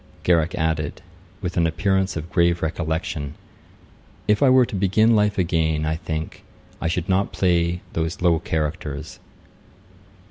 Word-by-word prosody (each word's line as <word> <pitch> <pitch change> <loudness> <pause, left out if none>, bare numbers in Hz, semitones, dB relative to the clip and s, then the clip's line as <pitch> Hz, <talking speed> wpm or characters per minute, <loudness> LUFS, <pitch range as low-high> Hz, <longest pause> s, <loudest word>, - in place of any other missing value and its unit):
Garrick 85 -2 +2
added, 80 -2 -2 0.4
with 90 +1 -3
an 85 -1 +3
appearance 95 +2 0
of 80 +2 -6
grave 85 -1 +2
recollection, 80 -2 -3 0.9
'If 105 +4 +3
I 140 - +6
were 130 -1 +6
to 105 - -6
begin 105 +4 +3
life 105 -1 +2
again, 80 -4 +1
I 80 0 0
think 80 -2 -5 0.4
I - - 0
should 85 +1 -1
not 95 +1 +1
play 85 -1 +1
those 80 +1 -2
low 85 -2 +3
characters.' 75 -3 -4
85 Hz, 140 wpm, -23 LUFS, 80-95 Hz, 0.9 s, I